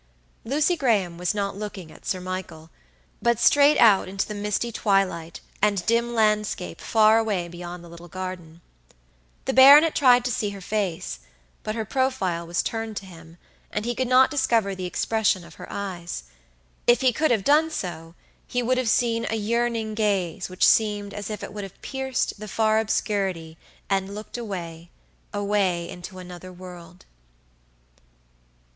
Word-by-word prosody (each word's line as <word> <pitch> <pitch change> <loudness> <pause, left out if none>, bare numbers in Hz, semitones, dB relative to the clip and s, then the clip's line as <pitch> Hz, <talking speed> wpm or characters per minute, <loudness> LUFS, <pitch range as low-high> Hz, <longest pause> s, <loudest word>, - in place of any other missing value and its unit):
Lucy 300 +8 +1
Graham 205 - 0
was 180 +4 -1
not 200 -2 -2
looking 200 -5 -7
at - - -14
Sir 185 - -1
Michael, 180 -3 -7 0.5
but 235 -1 +2
straight 290 +5 +5
out 210 -6 +5
into 195 +1 -2
the 210 - -5
misty 210 +3 -2
twilight 195 -6 0 0.2
and 200 -3 +1
dim 235 +1 +1
landscape 210 -4 0
far 220 0 +4
away 205 -6 -1
beyond 175 0 -8
the - - -12
little 170 +1 -12
garden. 175 -2 -7 0.8
The 265 - -1
baronet 285 +5 +8
tried 250 -3 +5
to 250 - 0
see 210 -2 -1
her 200 -1 -8
face, 195 -3 -3 0.4
but 215 - -4
her 220 -1 -3
profile 195 -10 -1
was 170 0 0
turned 225 -2 -4
to 195 - -6
him, 165 -2 -14 0.3
and 210 +1 -3
he 240 - -1
could 255 +1 -1
not 255 +2 +5
discover 230 -8 +1
the 185 -1 -4
expression 205 -1 0
of - - -14
her - - -8
eyes. 180 -4 -5 0.6
If 240 +2 +5
he 255 -2 +3
could 310 +6 +1
have 220 -5 +2
done 305 +5 +4
so, 170 - -6 0.3
he 245 0 -1
would 255 +2 +1
have 250 -3 0
seen 230 0 +1
a 225 - -1
yearning 225 0 -1
gaze 195 -5 -1
which 185 - +3
seemed 205 -2 +2
as 205 +1 -6
if 215 - -5
it - - -7
would 210 -1 -5
have 195 -1 -10
pierced 265 -5 -2
the 215 - -7
far 220 +1 +2
obscurity 195 -7 -1 0.3
and 195 0 -1
looked 215 +1 -8
awayaway 185 -1 -3
into 180 +2 -9
another 180 0 -9
world. 180 -1 -12
205 Hz, 165 wpm, -24 LUFS, 180-230 Hz, 0.8 s, baronet